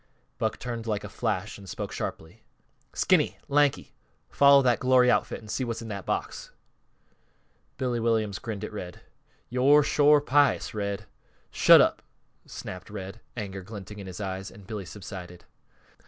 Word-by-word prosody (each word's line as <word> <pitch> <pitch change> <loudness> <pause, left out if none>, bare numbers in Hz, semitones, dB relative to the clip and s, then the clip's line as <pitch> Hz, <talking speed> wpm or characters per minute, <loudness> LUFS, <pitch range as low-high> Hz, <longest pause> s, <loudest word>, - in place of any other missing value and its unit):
Buck - - -1
turned 120 -2 -5
like 105 -2 -1
a 105 - -7
flash 105 -2 -3
and 100 -2 -11
spoke - - -5
sharply: 85 +8 -6 0.5
"Skinny! - - +2
Lanky! 145 -1 +1 0.4
Follow 140 -1 +6
that 125 -2 +3
glory 125 -1 +5
outfit, - - 0
an' - - -12
see 130 - -2
what's 115 -1 -4
in 110 - -8
that 100 -2 -6
box!" - - -3 1.3
Billy 125 -2 -1
Williams 110 -4 0
grinned 110 -3 -5
at 105 - -6
Red. 90 -4 -7 0.5
"Yo're 140 +4 +5
shore 145 +1 +5
pious, 145 0 +2
Red." 100 -2 -3 0.5
"Shut - - +7
up!" - - +1 0.5
snapped 90 +2 -8
Red, 100 +1 -7 0.2
anger 100 -3 -5
glinting 105 0 -9
in 100 - -8
his 90 +1 -8
eyes, 95 -1 -4
and 100 0 -15
Billy 105 -2 -6
subsided. 90 0 -9
110 Hz, 155 wpm, -27 LUFS, 95-125 Hz, 1.3 s, Shut